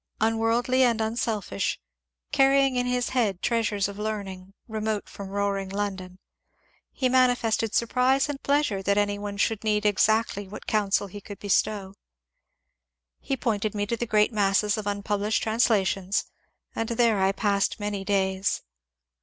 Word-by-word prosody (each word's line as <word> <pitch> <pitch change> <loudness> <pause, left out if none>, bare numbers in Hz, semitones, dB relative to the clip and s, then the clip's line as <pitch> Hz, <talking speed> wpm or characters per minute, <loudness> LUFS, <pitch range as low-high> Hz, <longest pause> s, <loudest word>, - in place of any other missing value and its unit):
Unworldly 225 +3 +2
and 235 -3 +3
unselfish, 220 - -2 0.5
carrying 270 -1 +4
in 245 0 0
his 250 -1 0
head 215 -8 0
treasures 220 -4 +1
of 200 0 -8
learning, 195 -3 -5 0.2
remote 215 -2 -3
from 200 -1 -9
roaring 200 -1 -1
London, 190 -2 -4 0.7
he 260 - 0
manifested 245 -4 +2
surprise 255 +4 +2
and 290 -2 -5
pleasure 280 -9 +1
that 200 +1 +1
any 205 0 +1
one 205 0 -5
should 220 +1 0
need 210 -1 +1
exactly 210 0 +2
that 205 - -10
counsel 205 -2 +1
he 200 +1 -9
could 205 0 -9
bestow. 200 -1 0 1.3
He 270 - -3
pointed 215 -3 -1
me 205 0 0
to 235 - -1
the 235 +1 -4
great 215 +1 +3
masses 205 0 +2
of 215 -2 -5
unpublished 205 +1 -1
translations, 205 -4 +1 0.5
and 225 - -2
there 230 -3 +2
I 190 0 +3
passed 200 0 0
many 205 -1 -3
days. 190 -1 0
210 Hz, 145 wpm, -26 LUFS, 200-230 Hz, 1.3 s, carrying